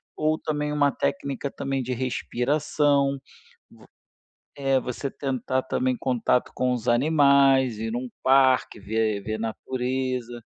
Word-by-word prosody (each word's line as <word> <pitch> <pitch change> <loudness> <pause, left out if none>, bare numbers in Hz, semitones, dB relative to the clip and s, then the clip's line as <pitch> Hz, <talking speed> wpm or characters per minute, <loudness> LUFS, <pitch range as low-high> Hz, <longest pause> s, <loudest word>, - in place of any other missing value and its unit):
ou 155 +1 +1
também 150 -1 -2
uma 145 -1 +2
técnica 140 -6 -2
também 135 0 -3
de 125 +1 -3
respiração, 140 +3 0 0.5
v - - -18 0.7
é, 135 -2 +1
você 125 +3 -4
tentar 130 -1 -2
também 130 -1 -1
contato 125 -1 0
com 125 0 0
os 120 -1 -3
animais, 135 -2 +4
ir 110 0 -3
num 125 +1 -3 0.2
parque, 130 -4 +3
ver 110 0 -1
ver 110 +1 -4
natureza. 125 +1 -3
130 Hz, 125 wpm, -25 LUFS, 120-140 Hz, 0.7 s, animais